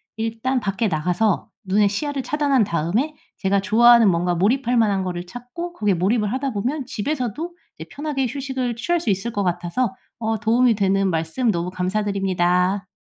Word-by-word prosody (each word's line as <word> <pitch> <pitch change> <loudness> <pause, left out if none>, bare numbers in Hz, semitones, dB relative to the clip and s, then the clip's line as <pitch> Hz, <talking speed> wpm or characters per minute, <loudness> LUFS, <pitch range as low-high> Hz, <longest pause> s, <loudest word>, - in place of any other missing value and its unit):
일단 225 +4 -1
밖에 200 +2 -1
나가서 180 +4 0 0.2
눈에 200 +2 +3
시야를 275 +6 -3
차단한 280 -2 +2
다음에 195 - -1 0.3
제가 195 0 +2
좋아하는 230 +2 +6
뭔가 175 0 +1
몰입할 240 +7 +1
만한 205 -4 +2
거를 175 -1 -4
찾고 245 - -7
거기에 210 - +1
몰입을 205 +4 +1
하다 265 +2 -1
보면 255 +7 -2
집에서도 280 - -3 0.2
이제 - - -9
편하게 285 -2 -2
휴식을 260 -2 -3
취할 345 +7 0
수 235 - -2
있을 200 +4 -1
것 205 - 0
같아서 180 +5 -1 0.3
어 220 -1 -1
도움이 230 +2 +3
되는 195 -1 +2
말씀 165 +8 0
너무 175 -1 -2
감사드립니다. 185 -1 0
215 Hz, 380 characters per minute, -22 LUFS, 190-255 Hz, 0.3 s, 좋아하는